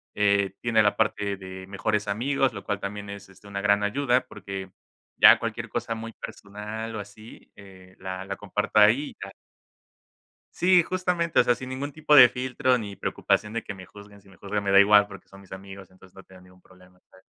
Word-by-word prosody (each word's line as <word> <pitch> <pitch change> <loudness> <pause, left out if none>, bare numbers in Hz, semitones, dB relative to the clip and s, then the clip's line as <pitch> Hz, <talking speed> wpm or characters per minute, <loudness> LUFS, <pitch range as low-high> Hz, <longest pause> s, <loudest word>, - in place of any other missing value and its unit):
eh. 100 -1 +1
Tiene 115 -2 +3
la 105 0 +1
parte 100 -2 -1
de 95 -1 -10
mejores 105 +2 -2
amigos, 130 +5 0
lo - - -8
cual 105 -2 -3
también 100 0 -6
es, 100 -1 -10
este, 95 +2 -18
una 100 -1 -5
gran 105 0 +2
ayuda, 125 +4 +1
porque 95 -1 -8 0.5
ya - - +8
cualquier - - -5
cosa 115 - -3
muy 115 0 -8
personal 105 +2 -8
o 110 - -4
así, 105 +2 -13
eh, 95 -2 -16
la 95 0 -6
la 100 0 -5
comparto 105 +1 -1
ahí, 115 +8 +4
y - - -21
ya. 95 - -8 1.2
Sí, 180 -1 +4
justamente, 180 -2 0
o - - +6
sea, 120 - +2
sin 130 +1 -8
ningún 135 +3 -5
tipo 150 +1 0
de 125 -4 +10
filtro 125 +2 0
ni 105 -4 -7
preocupación 105 +2 -1
de 115 - -3
que - - -6
me 95 -2 -12
juzguen. 100 0 -15
Si 100 - -21
me 95 - -19
juzgan, 100 0 -4
me 100 - -2
da 100 - +7
igual 105 0 +6
porque 100 -2 -13
son 95 0 -15
mis 95 - -20
amigos, 95 0 -10
entonces 95 0 -20
no 95 - -12
tengo 95 -1 -18
ningún 90 0 -20
problema, 90 0 -21
¿sabes? 95 0 -21
100 Hz, 210 wpm, -25 LUFS, 95-115 Hz, 1.2 s, de